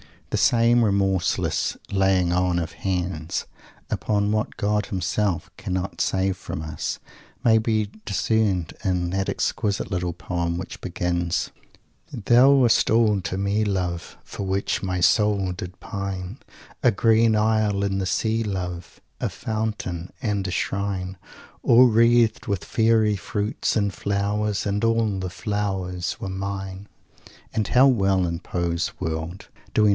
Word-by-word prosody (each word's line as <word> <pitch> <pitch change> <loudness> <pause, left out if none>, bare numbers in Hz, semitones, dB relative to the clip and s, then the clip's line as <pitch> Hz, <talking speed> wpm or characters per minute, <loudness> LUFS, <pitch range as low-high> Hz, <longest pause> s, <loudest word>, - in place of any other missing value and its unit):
The - - +1
same 120 0 +4
remorseless 95 -4 +1 0.2
"laying 95 -2 +2
on 90 0 +1
of 85 -2 -2
hands" 90 -4 -2 0.4
upon 105 -1 0
what 110 +1 -1
God 105 -1 +1
himself 95 0 -1
cannot 95 +1 -3
save 95 0 +1
from 80 - -6
us 80 -1 -4 0.4
may 110 -1 +5
be 110 -2 0
discerned 100 -3 0
in 90 -3 0
that 95 0 -1
exquisite 105 0 -1
little 90 -2 -1
poem 85 0 -2
which 90 - -6
begins: 85 -1 -1 0.6
"Thou 120 +5 +5
wast 125 -4 +4
all 110 -3 +4
to 90 +2 -3
me, 100 +2 +1
love, 90 -4 -2
For - - -6
which 95 +1 -1
my 90 -2 -2
soul 100 -1 +3
did 90 0 -7
pine; 100 +2 -5 0.4
A 125 - +5
green 110 +1 +3
isle 105 -2 +2
in 95 -1 0
the 95 - -1
Sea, 110 +4 0
love, 90 -5 -5 0.2
A - - -1
Fountain 105 -6 -4
and 105 -5 -1
a - - -3
Shrine 95 -1 -2 0.4
All 120 +2 +7
wreathed 115 +1 +3
with 100 -4 -1
Fairy 110 -2 +2
fruits 105 +4 -2
and 100 -3 +1
flowers; 100 +1 -1
And 100 +1 -1
all 115 -3 +2
the 95 -1 -3
flowers 95 -3 -3
were 95 - -4
mine!" 95 0 -5
100 Hz, 125 wpm, -24 LUFS, 90-110 Hz, 0.6 s, All